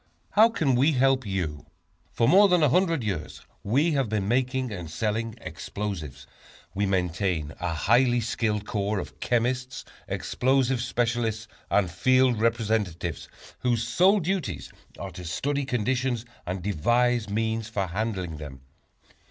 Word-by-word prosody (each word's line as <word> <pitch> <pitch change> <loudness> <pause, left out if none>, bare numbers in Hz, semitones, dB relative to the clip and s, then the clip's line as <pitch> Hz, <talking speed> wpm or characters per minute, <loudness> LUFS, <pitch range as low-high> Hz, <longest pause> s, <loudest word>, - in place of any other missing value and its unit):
How 220 +2 +6
Can 160 - +1
We 135 +6 +3
Help 130 -2 +2
You? 85 -7 -3 0.4
For 115 - +1
more 200 +7 +7
than 180 -4 +3
a 150 - +5
hundred 165 -3 +2
years 95 -8 -4 0.2
we 140 +11 +2
have 135 -6 0
been 105 -2 -1
making 130 +1 0
and 90 -5 -6
selling 110 +5 -2
explosives. 80 - -6 0.5
We 100 +1 0
maintain 90 -4 -1
a 90 -2 -2
highly 120 +8 +3
skilled 110 -2 -1
corps 105 -1 -1
of - - -6
chemists, 125 +1 -1 0.2
explosive 130 -1 +1
specialists, 115 -2 -1 0.2
and 95 -4 +2
field 130 +4 +3
representatives, 110 -7 -1 0.3
whose 120 -2 0
sole 190 - +4
duties 170 - -3 0.2
are 95 -1 -6
to 90 - -9
study 140 - -2
conditions 125 -1 -1 0.2
and 90 0 -3
devise 120 +5 +1
means 110 +1 -1
for 100 -3 -1
handling 95 -3 -3
them. 70 -3 -9
115 Hz, 135 wpm, -26 LUFS, 95-130 Hz, 0.5 s, more